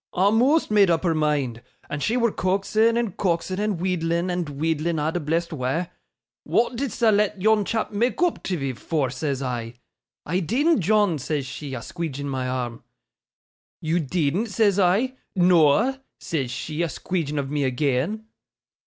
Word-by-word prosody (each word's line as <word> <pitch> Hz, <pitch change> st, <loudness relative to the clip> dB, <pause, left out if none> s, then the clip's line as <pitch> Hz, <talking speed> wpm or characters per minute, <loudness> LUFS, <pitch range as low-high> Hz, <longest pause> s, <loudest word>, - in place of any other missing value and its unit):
'A'most 225 Hz, -, +3 dB
made 205 Hz, -3 st, +5 dB
up 165 Hz, 0 st, +2 dB
her 170 Hz, -3 st, +2 dB
mind! 145 Hz, -7 st, 0 dB, 0.3 s
And 145 Hz, -, -4 dB
she 230 Hz, -, +1 dB
wur 235 Hz, -2 st, +2 dB
coaxin', 215 Hz, +5 st, +1 dB
and 230 Hz, -6 st, -1 dB
coaxin', 185 Hz, 0 st, -1 dB
and 210 Hz, -4 st, -1 dB
wheedlin', 175 Hz, -1 st, 0 dB
and 175 Hz, -3 st, -2 dB
wheedlin' 160 Hz, +3 st, -1 dB
a' 150 Hz, +1 st, 0 dB
the 175 Hz, -, -2 dB
blessed 165 Hz, +2 st, -1 dB
wa'. 135 Hz, +5 st, -1 dB, 0.6 s
"Wa'at 240 Hz, +2 st, +1 dB
didst 250 Hz, -1 st, -4 dB
thou 225 Hz, -2 st, +5 dB
let 205 Hz, -1 st, +1 dB
yon 215 Hz, +2 st, +3 dB
chap 225 Hz, +1 st, -2 dB
mak' 230 Hz, +5 st, 0 dB
oop 355 Hz, -1 st, +1 dB
tiv'ee 140 Hz, -8 st, -2 dB
for?" 135 Hz, 0 st, -2 dB
says 135 Hz, +1 st, -2 dB
I. 120 Hz, -2 st, -4 dB, 0.5 s
"I 180 Hz, +4 st, 0 dB
deedn't, 260 Hz, -, +2 dB
John," 200 Hz, -3 st, +2 dB
says 145 Hz, +1 st, -2 dB
she, 135 Hz, +1 st, -6 dB
a 120 Hz, -, -5 dB
squeedgin 155 Hz, -5 st, -5 dB
my 130 Hz, -2 st, -2 dB
arm. 125 Hz, -2 st, -4 dB, 1.0 s
"You 160 Hz, +2 st, 0 dB
deedn't?" 170 Hz, -, 0 dB
says 205 Hz, -2 st, +2 dB
I. 210 Hz, +8 st, +2 dB, 0.2 s
"Noa," 180 Hz, -, +4 dB, 0.2 s
says 140 Hz, -7 st, -2 dB
she, 150 Hz, +6 st, -4 dB
a 170 Hz, -, +1 dB
squeedgin 150 Hz, 0 st, -3 dB
of 140 Hz, -1 st, -2 dB
me 150 Hz, -1 st, 0 dB
agean. 145 Hz, -, -1 dB
170 Hz, 165 wpm, -24 LUFS, 145-210 Hz, 1.0 s, made